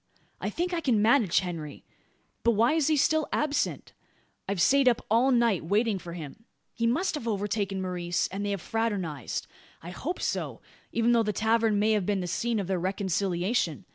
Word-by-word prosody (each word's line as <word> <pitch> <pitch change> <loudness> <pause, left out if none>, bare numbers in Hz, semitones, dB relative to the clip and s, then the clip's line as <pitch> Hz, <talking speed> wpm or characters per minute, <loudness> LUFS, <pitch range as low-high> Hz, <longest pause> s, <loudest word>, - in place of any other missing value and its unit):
I - - -2
think 355 +1 -2
I 340 - 0
can 250 -8 +2
manage 215 -4 +4
Henry. 165 -5 -6 0.6
But 235 - +3
why 230 +7 +3
is 315 -3 +2
he 310 -1 +3
still 315 +2 +2
absent? 295 -1 -1 0.6
I've 200 -2 -1
sate 275 +8 +4
up 240 -2 +2
all 240 +4 +4
night 235 -8 +2
waiting 205 +4 +1
for 170 -1 -8
him. 170 +6 -9 0.3
He 230 -1 0
must 320 +11 +1
have 295 -7 -4
overtaken 200 -2 -1
Maurice, 175 -1 -1
and 195 +2 -4
they 205 - -1
have 200 -3 -2
fraternised. 195 - -2 0.4
I 175 - -7
hope 320 - -4
so; - - -2 0.3
even 230 +1 +2
though 235 -1 +4
the 210 -1 -1
tavern 220 0 +2
may 215 +2 +2
have 210 -4 +1
been 205 -2 +1
the - - -3
scene 225 +6 -1
of 195 - -2
their 185 0 -1
reconciliation. 185 - -1
210 Hz, 190 wpm, -28 LUFS, 185-235 Hz, 0.6 s, manage